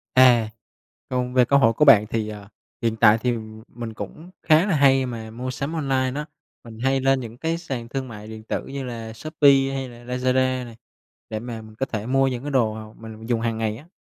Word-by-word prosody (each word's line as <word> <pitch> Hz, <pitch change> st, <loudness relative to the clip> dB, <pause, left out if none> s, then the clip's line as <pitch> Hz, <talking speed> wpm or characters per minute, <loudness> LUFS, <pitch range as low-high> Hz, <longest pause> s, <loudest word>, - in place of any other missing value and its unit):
À, 120 Hz, -4 st, +6 dB, 0.6 s
còn 125 Hz, -1 st, -2 dB
về 125 Hz, -1 st, +5 dB
cơ 140 Hz, +3 st, +4 dB
hội 115 Hz, -4 st, +4 dB
của 150 Hz, -, +3 dB
bạn 110 Hz, -7 st, +7 dB
thì, 110 Hz, -2 st, -2 dB
à, 105 Hz, -1 st, -9 dB, 0.3 s
hiện 115 Hz, -1 st, 0 dB
tại 110 Hz, -1 st, +6 dB
thì 120 Hz, +2 st, 0 dB, 0.4 s
mình 115 Hz, -1 st, -7 dB
cũng 155 Hz, -, -9 dB
khá 160 Hz, +3 st, +5 dB
là 195 Hz, -5 st, +1 dB
hay 135 Hz, -2 st, +4 dB
mà 115 Hz, -3 st, -6 dB
mua 125 Hz, +3 st, -5 dB
sắm 140 Hz, +5 st, -4 dB
online 135 Hz, -5 st, 0 dB
đó. 150 Hz, +1 st, -3 dB, 0.4 s
Mình 115 Hz, -2 st, -11 dB
hay 135 Hz, +2 st, +1 dB
lên 135 Hz, 0 st, +2 dB
những 115 Hz, -1 st, -8 dB
cái 165 Hz, +3 st, -1 dB
sàn 135 Hz, -9 st, -5 dB
thương 135 Hz, +1 st, -4 dB
mại 105 Hz, -3 st, -9 dB
điện 110 Hz, 0 st, -9 dB
tử -, -, -3 dB
như 140 Hz, 0 st, -5 dB
là 115 Hz, -3 st, -6 dB
Shopee 140 Hz, +1 st, +3 dB
hay 135 Hz, -1 st, -4 dB
là 120 Hz, 0 st, -14 dB
Lazada 130 Hz, 0 st, +1 dB
này, 115 Hz, -2 st, -12 dB, 0.5 s
để 110 Hz, -, -3 dB
mà 115 Hz, -1 st, -6 dB
mình 110 Hz, 0 st, -14 dB
có 135 Hz, -, -1 dB
thể 110 Hz, -5 st, -4 dB
mua 135 Hz, +1 st, +3 dB
những 125 Hz, -1 st, -3 dB
cái 145 Hz, -, -4 dB
đồ 115 Hz, -5 st, +2 dB
mà 110 Hz, 0 st, -9 dB
mình 110 Hz, -1 st, -10 dB
mình 115 Hz, -, -10 dB
dùng 115 Hz, -2 st, +1 dB
hàng 115 Hz, -1 st, -1 dB
ngày 110 Hz, -1 st, -2 dB
á. 150 Hz, +7 st, -15 dB
125 Hz, 235 wpm, -23 LUFS, 110-135 Hz, 0.6 s, bạn